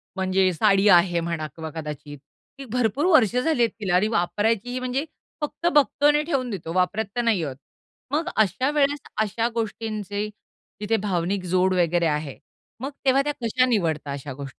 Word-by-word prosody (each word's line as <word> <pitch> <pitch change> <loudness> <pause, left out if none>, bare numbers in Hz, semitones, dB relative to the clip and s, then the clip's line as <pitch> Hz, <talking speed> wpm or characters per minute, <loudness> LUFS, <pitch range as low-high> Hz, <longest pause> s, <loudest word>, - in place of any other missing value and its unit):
म्हणजे 190 0 +2
साडी 195 +5 +3
आहे 175 -1 +5
म्हणा 165 -2 -3
किंवा 160 -1 -6
कदाचित. 150 -2 -7 0.4
ती 270 - -7
भरपूर 250 - 0
वर्ष 250 - +4
झाली 280 +1 +1
आहेत 230 - +3
तिला 190 -4 0
आणि 200 +4 +3
वापरायचीही 220 +5 0
म्हणजे 255 +4 -2 0.4
फक्त 295 +3 -5
बघतो 290 0 +3
आणि 295 0 +3
ठेवून 270 -6 -1
देतो. 170 -5 -5
वापरात 185 +4 +1
तर 240 - +1
नाही 220 -8 +1
आहोत. 135 -3 -4 0.6
मग 320 +4 0
अशा 220 +6 +2
वेळेस 290 -1 +1 0.2
अशा 220 +2 0
गोष्टींचे 215 -2 -3 0.5
तिथे 215 +2 0
भावनिक 185 0 -1
जोड 185 0 +3
वगैरे 175 -1 +2
आहे. 150 -3 -2 0.4
मग 275 +2 -4
तेव्हा 270 +1 +4
त्या 295 0 -1
कशा 250 +3 +2
निवडता 160 - 0
अशा 140 -1 -6
गोष्टी? 140 +1 -7
210 Hz, 170 wpm, -24 LUFS, 175-255 Hz, 0.6 s, आहे